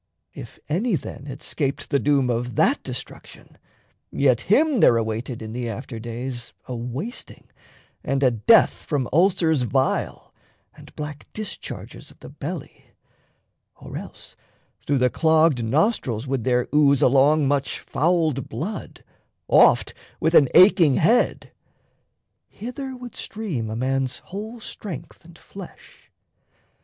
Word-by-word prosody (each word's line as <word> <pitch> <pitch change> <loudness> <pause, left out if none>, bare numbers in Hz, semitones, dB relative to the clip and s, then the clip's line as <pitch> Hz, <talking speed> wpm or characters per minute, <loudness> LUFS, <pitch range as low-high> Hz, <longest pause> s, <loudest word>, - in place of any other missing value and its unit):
If - - -10
any 195 +8 0
then 140 -3 -7
Had 135 0 -8
'scaped 140 -3 -3
the 140 - +3
doom 135 -3 +2
of 120 0 -3
that - - +2
destruction, - - -9 0.5
yet 130 -4 +2
Him 280 - +3
there 120 -9 +6
awaited 115 +1 -3
in 110 0 -7
the 120 -1 -3
after 115 +1 -6
days 120 +2 -6
A 125 - -4
wasting 125 - -7 0.5
and 135 0 -1
a 130 - +5
death 120 - +5
from 140 -5 -3
ulcers 165 -3 +3
vile 130 +2 -1 0.4
And - - -16
black 150 -1 -7
discharges 215 -2 -7
of - - -19
the - - -11
belly, - - -8 0.8
or - - -11
else - - -9 0.4
Through 140 - -1
the 125 -1 +2
clogged 160 -4 +3
nostrils 130 - 0
would 130 -4 -2
there 125 -1 +1
ooze 140 -2 +4
along 140 +3 +4
Much 140 0 0
fouled 160 -4 0
blood, 165 - -6 0.4
oft - - +5 0.3
with 160 - +1
an 140 -6 +6
aching 175 -7 +7
head: 230 +9 +2 1.0
Hither 260 +3 -7
would 245 -1 -10
stream 175 - -4
a 110 - -4
man's 130 +1 -1
whole 215 - -8
strength 195 - -8
and 170 0 -16
flesh. 195 +1 -13
140 Hz, 130 wpm, -23 LUFS, 125-175 Hz, 1.0 s, aching